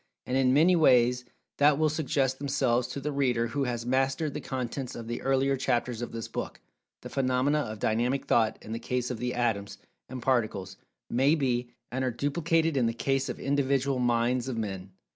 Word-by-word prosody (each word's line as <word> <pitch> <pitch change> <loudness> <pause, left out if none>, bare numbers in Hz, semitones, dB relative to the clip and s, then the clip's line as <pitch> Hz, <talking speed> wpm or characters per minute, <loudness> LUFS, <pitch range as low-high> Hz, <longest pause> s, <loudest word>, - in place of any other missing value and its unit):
And, 125 - -2
in 130 -1 +3
many 165 +7 +5
ways 125 -5 +4 0.3
that 145 0 +5
will 155 0 +3
suggest 140 -4 0
themselves 130 -4 +1
to 130 - -5
the 150 +2 -3
reader 125 -5 +1
who 140 +3 -1
has 120 -2 -3
mastered 135 +4 0
the - - -4
contents 130 0 -4
of 115 -1 -7
the 120 - -4
earlier 135 0 +2
chapters 120 -2 -1
of 120 - -4
this 115 -1 -5
book, - - -5 0.4
the - - -8
phenomena 135 +2 +1
of 110 -7 -4
Dynamic 120 +6 0
Thought 110 -1 +2
in 110 - -9
the 115 - -3
case 125 +1 -2
of 120 - -5
the 125 +1 -2
Atoms, 110 -5 -1 0.3
and 130 0 -6
Particles, 110 -7 -1 0.3
may 135 +6 +3
be, 125 -5 -1 0.2
and 130 +2 -2
are 130 - +1
duplicated 160 +5 0
in 120 -3 +3
the 115 - -1
case 135 +2 0
of 125 - -5
Individual 140 -1 +1
Minds 120 +1 +1
of 125 -3 -3
Men. 95 -4 -4
130 Hz, 195 wpm, -28 LUFS, 120-140 Hz, 0.4 s, many